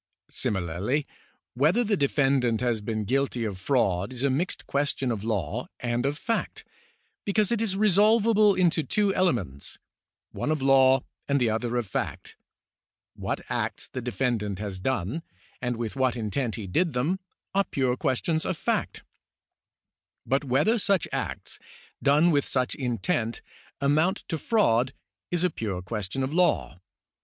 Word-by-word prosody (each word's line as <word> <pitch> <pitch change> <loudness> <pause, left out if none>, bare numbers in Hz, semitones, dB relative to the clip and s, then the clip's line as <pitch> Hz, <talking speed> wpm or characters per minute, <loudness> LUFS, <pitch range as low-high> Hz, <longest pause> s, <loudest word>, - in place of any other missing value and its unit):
Similarly, 95 - -1 0.5
whether 155 - +3
the 215 -2 +1
defendant 135 - +2
has 120 -3 0
been 110 0 -2
guilty 130 0 0
of 100 -4 -4
fraud 100 -3 +1
is 125 0 -5
a 140 - +3
mixed 165 +8 -2
question 140 -2 -1
of 105 -3 -3
law 100 -9 -2
and 120 +1 0
of 145 +1 -2
fact, 230 +6 -3 0.6
because 210 +1 +1
it 230 -2 +1
is 200 -4 0
resolvable 215 +1 +5
into 175 -3 +3
two 200 +7 +1
elements, 115 - -1 0.5
one - - -3
of 155 -1 +1
law 135 -1 +5 0.2
and 140 0 +2
the 120 -3 +2
other 120 +2 -1
of 120 - 0
fact; 95 - -4 0.8
what - - -3
acts - - -3
the 130 - -5
defendant 120 -5 -1
has 100 -2 -5
done, 125 - -1 0.4
and 125 -2 -1
with 115 0 -4
what 130 -2 +1
intent 115 +2 -2
he 110 - -5
did 160 - +1
them, 150 +10 0 0.3
are 200 0 +3
pure 130 -5 0
questions 155 +4 0
of 185 - -2
fact; - - -1 1.2
but 135 +2 +1
whether 145 - +2
such 195 -3 +2
acts, - - -4 0.4
done 150 +5 +4
with 145 -2 +2
such 130 -1 0
an - - -9
intent, 120 -1 -1 0.4
amount 155 +7 +2
to 160 - -2
fraud 135 - +2 0.4
is 175 0 0
a 180 - +2
pure 100 - -4
question 105 +6 -3
of 135 +3 -2
law. 160 - +1
135 Hz, 150 wpm, -27 LUFS, 115-170 Hz, 1.2 s, resolvable